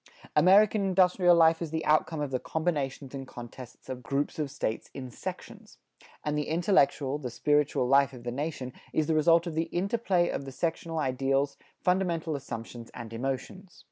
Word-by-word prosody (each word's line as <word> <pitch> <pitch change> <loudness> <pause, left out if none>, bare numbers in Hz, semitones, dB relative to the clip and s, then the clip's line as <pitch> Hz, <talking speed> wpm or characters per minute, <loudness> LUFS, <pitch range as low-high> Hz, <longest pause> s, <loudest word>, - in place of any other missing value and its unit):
American 200 +6 +5
industrial 180 -2 +4
life 165 0 +5
is 165 - -3
the 160 +1 -3
outcome 155 0 +2
of 145 -2 -3
the 130 - 0
combinations 145 -5 -2
and 135 -1 -6
contests 120 0 -11
of 130 -1 -6
groups 140 +5 -2
of 150 -2 -1
States 120 -5 -3
in 130 -2 -7
sections. - - -8 0.5
And 150 0 -1
the 150 -1 -1
intellectual, 155 -5 +2
the 130 -4 -4
spiritual 145 0 +1
life 140 +1 +4
of 125 -3 -11
the 120 - -3
nation 135 -2 -4 0.2
is 155 - +2
the 160 - +1
result 165 +2 +4
of 170 - -4
the 165 +1 0
interplay 190 -2 +1
of 140 - -3
the 135 - -7
sectional 165 +3 -3
ideals, 135 0 0 0.3
fundamental 175 -4 +1
assumptions 115 -3 -7
and 115 -1 -8
emotions. 135 - -5
150 Hz, 175 wpm, -29 LUFS, 135-170 Hz, 0.5 s, American